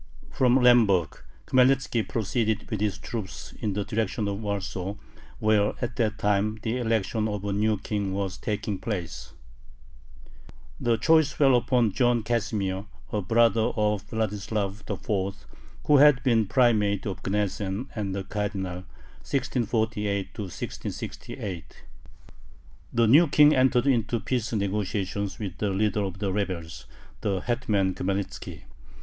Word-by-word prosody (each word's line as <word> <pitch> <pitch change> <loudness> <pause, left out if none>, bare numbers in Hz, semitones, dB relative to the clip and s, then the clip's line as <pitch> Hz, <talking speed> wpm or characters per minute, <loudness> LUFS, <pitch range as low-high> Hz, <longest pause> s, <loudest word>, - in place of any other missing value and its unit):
From 125 -1 +3
Lemberg 115 - +4 0.2
Khmelnitzki 130 -3 +2
proceeded 110 0 -1
with 105 -2 -2
his 105 -2 0
troops 105 -3 -6
in 105 -2 -1
the 100 +1 -1
direction 110 -1 -1
of 100 0 -3
Warsaw, 100 -2 -3 0.4
where 105 -1 +2
at 120 0 -3
that 110 -3 0
time 105 +1 +1
the 115 +2 -1
election 110 -2 0
of 105 -2 -4
a 100 - -1
new 105 +1 +1
king 100 -1 -3
was 95 -1 -3
taking 105 -2 -3
place. 95 -7 -5 1.5
The 115 -1 +1
choice 160 +4 +4
fell 135 -2 +4
upon 120 -2 +2
John 120 +1 +2
Casimir, 105 -4 -1 0.3
a 105 - 0
brother 115 +2 +3
of 105 -1 0
Vladislav 105 -2 -2
IV., 100 -1 -2 0.5
who 150 - +6
had 140 -2 +6
been 115 -6 +3
Primate 105 -3 +2
of 95 -3 -4
Gnesen 100 +3 -2
and 100 -3 -3
a 95 - -3
Cardinal 95 -3 -4 0.4
(1648 110 -6 -1
1668). 95 -1 -6 1.1
The 120 -1 +3
new 150 +10 +6
King 150 +1 +6
entered 130 0 +3
into 120 -3 +1
peace 120 +1 -2
negotiations 100 -1 -2
with 95 -4 -6
the 105 - 0
leader 105 +1 +1
of 95 -2 -3
the 95 -1 -2
rebels, 90 -6 -4 0.3
the 95 -3 -1
hetman 105 -6 0
Khmelnitzki. 100 +2 -4
105 Hz, 130 wpm, -26 LUFS, 100-120 Hz, 1.5 s, who